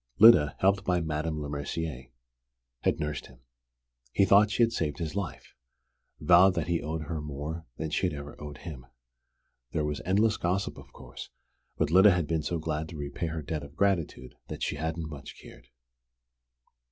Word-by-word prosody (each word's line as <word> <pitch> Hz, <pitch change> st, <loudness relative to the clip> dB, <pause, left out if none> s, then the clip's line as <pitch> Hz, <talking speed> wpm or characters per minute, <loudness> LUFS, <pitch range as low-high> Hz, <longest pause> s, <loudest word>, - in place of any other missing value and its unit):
Lyda, 100 Hz, -11 st, +7 dB
helped 100 Hz, +1 st, +2 dB
by 90 Hz, -2 st, +1 dB
Madame 80 Hz, -1 st, -2 dB
Lemercier, 70 Hz, -2 st, -4 dB, 0.7 s
had -, -, 0 dB
nursed 75 Hz, -2 st, -3 dB
him. 60 Hz, -1 st, -19 dB, 0.7 s
He 100 Hz, -, +4 dB
thought 100 Hz, +2 st, +6 dB
she 115 Hz, +3 st, +3 dB
had 115 Hz, -, +3 dB
saved 75 Hz, -7 st, -1 dB
his 80 Hz, -2 st, -4 dB
life 100 Hz, -6 st, -5 dB, 0.7 s
vowed 90 Hz, +2 st, +6 dB
that -, -, 0 dB
he 85 Hz, -1 st, 0 dB
owed 80 Hz, +1 st, -3 dB
her 80 Hz, 0 st, -4 dB
more 75 Hz, +2 st, -6 dB
than 80 Hz, -1 st, -4 dB
she 95 Hz, -, +1 dB
had 90 Hz, -, -3 dB
ever 70 Hz, 0 st, -8 dB
owed 75 Hz, -1 st, -7 dB
him. 65 Hz, -8 st, -9 dB, 0.9 s
There 75 Hz, -2 st, 0 dB
was 75 Hz, -1 st, -3 dB
endless 105 Hz, +4 st, +2 dB
gossip, 90 Hz, +3 st, -1 dB
of -, -, -15 dB
course, -, -, -10 dB, 0.5 s
but 75 Hz, -, +1 dB
Lyda 95 Hz, +4 st, +8 dB
had 90 Hz, -4 st, +2 dB
been 80 Hz, +1 st, 0 dB
so 85 Hz, +2 st, -2 dB
glad 80 Hz, 0 st, -3 dB
to 80 Hz, -, -8 dB
repay 70 Hz, +3 st, -4 dB
her 80 Hz, -1 st, -4 dB
debt 75 Hz, +1 st, -3 dB
of 70 Hz, 0 st, -11 dB
gratitude 85 Hz, -10 st, 0 dB
that -, -, -6 dB
she 75 Hz, -, -1 dB
hadn't 80 Hz, +1 st, -3 dB
much 75 Hz, -3 st, -9 dB
cared. -, -, -14 dB
80 Hz, 175 wpm, -29 LUFS, 75-90 Hz, 0.9 s, Lyda